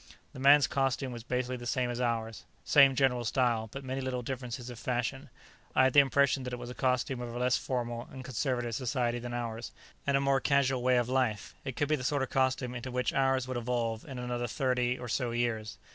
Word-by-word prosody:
The - - -9
man's 140 +1 +7
costume 135 +1 0
was 120 -1 -6
basically 125 +1 -2
the 120 0 -7
same 125 0 0
as 120 +1 -3
ours 115 -3 -2 0.2
same 135 -2 +6
general 125 -2 +2
style, 115 -2 +1
but 135 +3 -7
many 130 +1 -3
little 130 -1 -3
differences 125 -1 -5
of 120 - -9
fashion. 125 +2 -2 0.5
I - - +6
had 130 -1 +3
the 145 - +8
impression 140 0 +3
that 125 -1 -5
it - - -2
was 120 0 -7
the - - -6
costume 125 0 0
of 120 -1 -5
a 120 - -6
less 125 0 +2
formal 120 -2 -3
and 130 -1 -9
conservative 125 -2 -1
society 120 -1 -1
than 120 0 -5
ours 115 -1 -4 0.4
and 140 -1 +4
a - - +2
more 140 -1 +2
casual 135 -2 +2
way 125 0 +3
of 120 -1 +1
life. 125 -6 0
It 135 -3 -5
could 145 - 0
be 155 - +2
the 130 - -6
sort 140 +1 +1
of 130 - -5
costume 130 -1 +1
into 125 +1 -5
which 125 0 -1
ours 135 -1 +2
would 130 -1 -3
evolve 115 -2 -1
in 135 -3 -7
another 120 0 -2
thirty 125 0 0
or 125 - -7
so 120 +2 -1
years. 115 -2 -2
125 Hz, 230 wpm, -30 LUFS, 120-130 Hz, 0.5 s, the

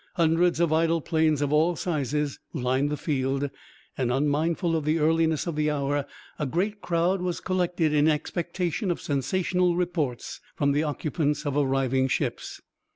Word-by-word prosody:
Hundreds 170 0 +2
of 170 -2 +2
idle 165 +1 +2
planes 160 -2 +1
of 145 +1 0
all 165 +3 +3
sizes 150 -4 -2
lined 130 0 0
the 150 - -2
field, 135 -2 -1 0.4
and, 125 -2 0
unmindful 155 +5 +1
of 160 - -1
the 155 +2 +1
earliness 160 0 +2
the 155 -3 -1
hour, 145 -1 -1 0.3
a 150 - -1
great 200 +9 -1
crowd 175 +2 +1
was 180 -1 -2
collected 175 -4 0
in 150 0 +4
expectation 175 +5 -1
of 175 - -1
sensational 180 +5 0
reports 165 -9 -2
from 140 -1 +1
the 145 +2 +2
occupants 150 0 -1
of 145 -1 -1
arriving 135 -2 +1
ships. - - -2
155 Hz, 155 wpm, -26 LUFS, 145-170 Hz, 0.4 s, in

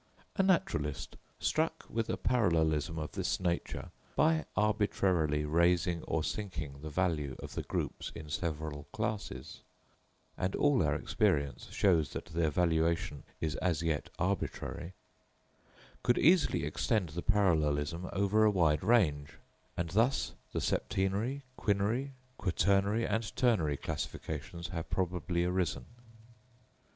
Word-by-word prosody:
A 195 - +3
naturalist, 185 - 0 0.2
struck 160 +1 0
with 115 -1 -2
a - - 0
parallelism 80 - +2
of 75 -1 -4
this - - -1
nature, 85 -2 -2 0.2
by 160 0 +3
arbitrarily 95 -8 +2
raising 85 +2 +2
or 80 -1 0
sinking 75 -9 -4
the 80 - -5
value 75 -5 0
of - - -8
the - - -2
groups - - -3
in 75 - -7
several 75 -2 -3
classes 105 -1 -4 0.7
(and 95 +1 -1
all 145 -3 +3
our 75 -3 +2
experience 70 -1 0
shows 80 -8 +2
that - - -5
their 80 -1 0
valuation 85 0 +1 0.2
is 80 -2 -1
as 85 -3 0
yet 80 -3 -1
arbitrary), 90 -1 -2 1.1
could 120 - +3
easily 170 +1 +4
extend 105 -8 0
the 85 +3 -4
parallelism 85 -5 +1
over 100 +3 +3
a 110 - +6
wide 85 -6 +2
range; 85 -10 +3 0.4
and 85 -2 -2
thus 115 +8 +2 0.2
the - - -2
septenary, 105 +9 0 0.2
quinary, 110 +7 0 0.3
quaternary 100 +4 +2
and 110 +1 -2
ternary 85 - +2
classifications 80 +5 -5
have 85 -3 -5
probably 90 -1 0
arisen. 90 -1 0
90 Hz, 120 wpm, -32 LUFS, 80-105 Hz, 1.1 s, a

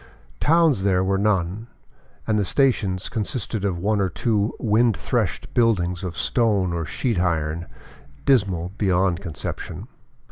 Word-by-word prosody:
Towns 160 - +3
there 95 -1 +2
were 95 0 +1
none; 100 +1 0 0.6
and 110 -1 +1
the - - +2
stations 100 -5 +1
consisted 110 -1 -3
of 95 -3 0
one 100 +3 0
or 95 - +1
two 105 +3 0
wind 115 -1 +2
threshed - - -2
buildings 95 -6 +1
of 85 -3 -5
stone 100 -7 +1
or 85 -2 -3
sheet 115 - -1
iron, 85 -1 -1 0.6
dismal 95 -10 +2
beyond 95 -2 +1
conception. 85 -6 -6
100 Hz, 135 wpm, -23 LUFS, 90-110 Hz, 0.6 s, Towns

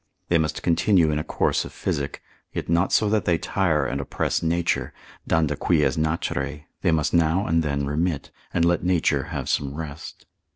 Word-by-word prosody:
They 85 - +4
must 80 -1 -2
continue 85 -1 +3
in 75 - 0
a - - -3
course - - 0
of - - -9
physic, 70 -1 -3 0.3
yet - - -4
not 85 +3 +2
so 110 - +3
that 110 -2 +1
they 85 -2 +3
tire 80 -6 +1
and 65 +2 -2
oppress 70 - -1
nature, 85 +1 0 0.4
danda 80 -3 +2
quies - - +2
naturae, 75 -2 -2 0.2
they 90 - +2
must 80 -2 +1
now 85 +3 +3
and 80 0 +2
then 70 -2 -1
remit, 75 +1 -1 0.2
and 85 -1 +2
let 85 0 +2
nature 90 -2 +2
have - - -5
some 70 0 -1
rest. 80 0 -8
80 Hz, 180 wpm, -24 LUFS, 75-85 Hz, 0.4 s, They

